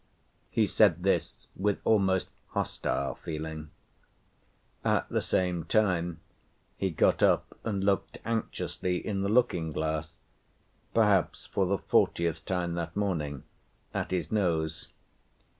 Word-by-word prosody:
He 110 - +3
said 95 -4 +4
this 95 - 0
with 100 +1 +1
almost 95 -4 +3 0.2
hostile 70 - -1
feeling. 80 -1 -6 1.1
At - - +2
the - - 0
same 90 -2 0
time 85 -5 +1 0.5
he 95 - 0
got 80 - +2
up - - +3
and 100 -4 -1
looked 100 -1 +1
anxiously 110 -5 -1
in 100 -3 -1
the 100 - 0
looking‐glass 80 -9 +1 0.8
(perhaps 105 -5 +3
for 95 -2 0
the 100 +2 +1
fortieth 85 -2 +1
time 90 -3 -1
that 85 -1 -4
morning) 80 -9 -1 0.5
at - - -2
his 90 -4 -2
nose. 80 -7 0
90 Hz, 115 wpm, -29 LUFS, 80-100 Hz, 1.1 s, said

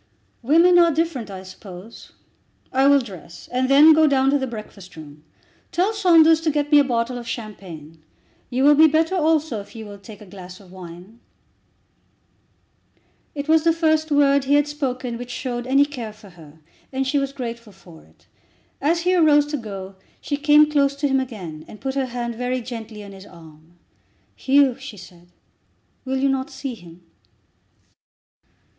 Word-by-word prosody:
"Women 335 +7 +5
are 340 -1 +5
different, 300 -8 -2
I 190 -1 -8
suppose. 185 +2 -12 0.6
I 265 +1 +3
will 280 0 +5
dress 185 -7 -12
and 255 +1 0
then 295 +3 +7
go 315 0 +4
down 270 -1 +2
to 285 - +2
the 265 - -3
breakfast 210 -5 -10
room. 150 -1 -13 0.5
Tell 370 +5 0
Saunders 330 -6 +5
to 325 - 0
get 295 0 -1
me 295 - +7
a - - +5
bottle 245 -1 -2
of 235 - -10
champagne. 175 -9 -9 0.5
You 255 +1 -1
will 295 +1 +7
be 315 +2 +6
better 320 +3 +1
also 315 - +1
if 200 - -16
you 220 -1 -8
will 205 -1 -11
take 200 +1 -13
a 210 - -13
glass 185 -1 -12
of 190 -3 -18
wine." 185 +4 -12 2.2
It 285 0 -5
was 320 0 +3
the 330 - +4
first 315 -1 +1
word 280 -2 +3
he 285 +2 +3
had 290 0 +3
spoken 255 -5 -4
which 245 0 -8
showed 245 0 -5
any 275 +2 +4
care 245 -7 -7
for 210 -1 -16
her, 160 -2 -17 0.3
and 270 0 -2
she 280 +2 0
was 275 0 -2
grateful 235 -4 -7
for 175 -4 -17
it. - - -27 0.6
As 335 +4 +1
he 360 +2 +1
arose 305 -4 +4
to 300 - -1
go, 195 -5 -8 0.2
she 290 - -3
came 295 +1 +4
close 280 -1 +2
to 285 +1 -1
him 270 -1 +1
again, 185 -12 -7
and 215 - -13
put 265 -1 -4
her 270 -1 -1
hand 240 -1 -4
very 250 +2 -3
gently 225 -3 -8
on 200 - -11
his 195 +1 -13
arm. 160 0 -17 0.6
"Hugh," 275 -1 +3
she 260 -5 -10
said, 175 -1 -15 0.8
"will 265 0 -2
you 270 +1 +1
not 265 -1 -2
see 270 -3 -6
him?" 175 -4 -15
255 Hz, 180 wpm, -21 LUFS, 200-290 Hz, 2.2 s, then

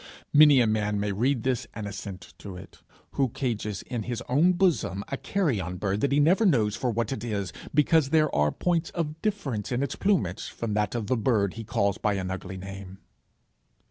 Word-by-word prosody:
Many 145 -3 +8
a - - +4
man 105 -1 0
might 100 -1 -1
read 125 +2 +1
this 130 -3 -1
and 110 - -5
assent 100 -2 -8
to 100 -3 -8
it, 95 - -13 0.3
who 135 -2 +1
cages 110 -5 -3
in 120 -2 -4
his 120 +2 -4
own 155 +9 +4
bosom 170 - +1
a - - -2
carrion 130 - -1
bird 100 +2 -1
that 140 - +1
he 140 - +3
never 175 +9 +4
knows 115 - +3
for 125 - -1
what 115 +1 -1
it 120 -5 -4
is, 100 -6 -3 0.2
because 150 0 +3
there 155 -1 +3
are 75 0 +3
points 170 -2 0
of 160 -2 -3
difference 150 - -2
in 125 +2 0
its 140 - -3
plumage 110 - 0
from 115 -3 -4
that 105 +1 0
of 115 -3 -2
the 130 +3 0
bird 105 -5 +1
he 115 - -7
calls 100 -3 0
by 105 -1 +1
an 95 -1 -3
ugly 95 0 -6
name. 95 0 -8
115 Hz, 205 wpm, -27 LUFS, 100-140 Hz, 0.3 s, Many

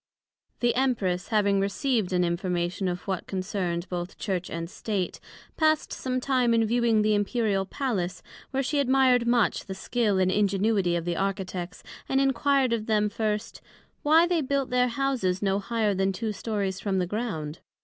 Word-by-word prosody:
The 240 -1 +3
Empress 215 -9 0
having 205 -3 +2
received 210 +1 0
an 180 -1 +2
information 175 +1 -1
of 180 0 -3
what 190 -3 -3
concerned 185 -2 -2
both 175 0 -5
Church 185 -3 -2
and 165 0 -4
State, 195 0 -3 0.4
passed 310 -1 +2
some 255 -1 -2
time 250 -3 +2
in 225 -1 +3
viewing 230 -1 +2
the 215 0 +3
Imperial 205 -2 0
Palace, 195 -9 -2 0.3
where 270 0 -1
she 290 +2 0
admired 260 -3 +3
much 235 -2 +2
the 190 - -5
skil 210 0 0
and 185 0 +3
ingenuity 200 -2 +2
of 170 -1 -2
the 175 -1 -1
Architects, 190 -2 -3 0.3
and 270 - +2
enquired 270 -1 +2
of 220 -2 -2
them, 210 -1 +2
first, 210 +1 -3 0.4
Why 320 +3 +5
they 345 -2 +1
built 275 -1 -1
their 250 0 +3
Houses 240 -8 -1
no 195 0 +2
higher 215 0 0
then 195 0 +1
two 220 +3 -2
stories 200 -3 -2
from 195 -1 -1
the 180 - +1
Ground? 175 -7 -4
210 Hz, 170 wpm, -27 LUFS, 185-245 Hz, 0.4 s, Why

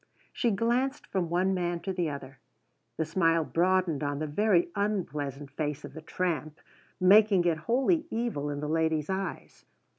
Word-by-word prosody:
She 240 - +1
glanced 240 +6 0
from 180 -4 -2
one 185 +3 +1
man 175 -2 -1
to 190 +2 -3
the 175 -3 -1
other. 135 -2 -8 0.6
The 160 - 0
smile 165 0 +2
broadened 175 -2 +1
on 145 0 -1
the 155 - -2
very 175 +3 +2
unpleasant 150 -9 -2
face 150 0 -3
of 140 - -10
the 160 - -8
tramp, 155 -2 -3 0.4
making 195 0 +5
it 165 -2 +1
wholly 270 +7 +2
evil 225 -11 -2
in 145 0 -4
the 150 - -3
lady's 160 +1 0
eyes. 190 0 -5
175 Hz, 160 wpm, -29 LUFS, 150-195 Hz, 0.6 s, making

